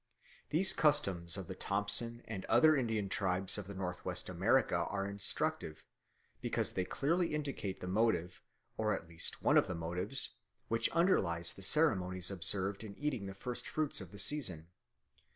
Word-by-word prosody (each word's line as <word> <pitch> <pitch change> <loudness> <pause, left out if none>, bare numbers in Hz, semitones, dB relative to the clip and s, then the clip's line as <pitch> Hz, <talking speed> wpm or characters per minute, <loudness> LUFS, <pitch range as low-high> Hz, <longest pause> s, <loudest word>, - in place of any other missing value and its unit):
These 185 +5 +5
customs 95 - +2
of 95 - -5
the 95 - -6
Thompson 105 +5 0
and 95 -4 -5
other 155 -1 +5
Indian 115 -6 -1
tribes 95 0 0
of 100 -1 -8
North 90 -2 -4
West - - -3
America - - +2
are 100 -1 -2
instructive, 100 -5 -3 0.6
because - - -1
they 95 - -2
clearly 165 - 0
indicate 140 -10 -4
the 90 - -5
motive, 95 -3 0 0.4
or 105 -1 +1
at 85 - -8
least 85 -1 -4
one - - +4
of - - -1
the 95 - -4
motives, 90 +10 +2 0.4
which 115 0 +1
underlies 95 - +1
the - - -12
ceremonies 95 - +2
observed 95 +3 +2
at 100 -2 -9
eating 130 -9 -3
the 95 - -7
first 125 +5 -6
fruits 155 -7 -1
of 90 -3 -10
the 100 - -11
season. 90 - 0
100 Hz, 160 wpm, -34 LUFS, 90-125 Hz, 0.6 s, These